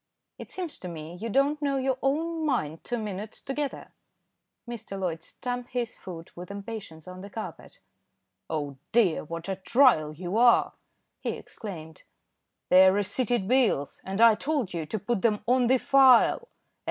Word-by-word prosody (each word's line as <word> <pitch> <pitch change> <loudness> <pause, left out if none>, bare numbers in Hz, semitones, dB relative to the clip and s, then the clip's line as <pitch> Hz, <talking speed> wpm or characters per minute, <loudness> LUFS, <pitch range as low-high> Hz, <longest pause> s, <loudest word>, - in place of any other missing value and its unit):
It - - -9
seems 355 -5 -5
to 180 - -7
me 160 -1 -7
you 215 +6 -5
don't 280 +5 +2
know 280 -1 0
your 260 -1 0
own 320 +4 0
mind 165 - -1
two 245 - -2
minutes 210 -1 -5
together." 280 +1 -4 0.7
Mr. 225 -4 -6
Loyd 170 -4 -2
stamped 245 +7 -6
his 240 -2 -2
foot 170 -3 -10
with 180 +2 -9
impatience 200 -6 -8
on 185 0 -9
the 200 - -9
carpet. 220 +1 -8 0.7
"Oh 145 -4 -3
dear! 215 -8 +3
what 165 +2 -7
a 190 -1 -2
trial 195 - +4
you 175 +6 -4
are," 240 0 +5 0.5
he - - -2
exclaimed. 160 -7 -9 0.7
"They 185 +1 +8
are - - +7
receipted 205 +2 0
bills, 235 - +1
and 195 +3 -3
I 230 -1 +8
told 270 - -2
you 165 -3 -3
to 220 - -3
put 215 0 -2
them 210 -1 +1
on 250 0 +3
the 260 +2 +5
file. 270 - +5
215 Hz, 165 wpm, -27 LUFS, 180-255 Hz, 0.7 s, They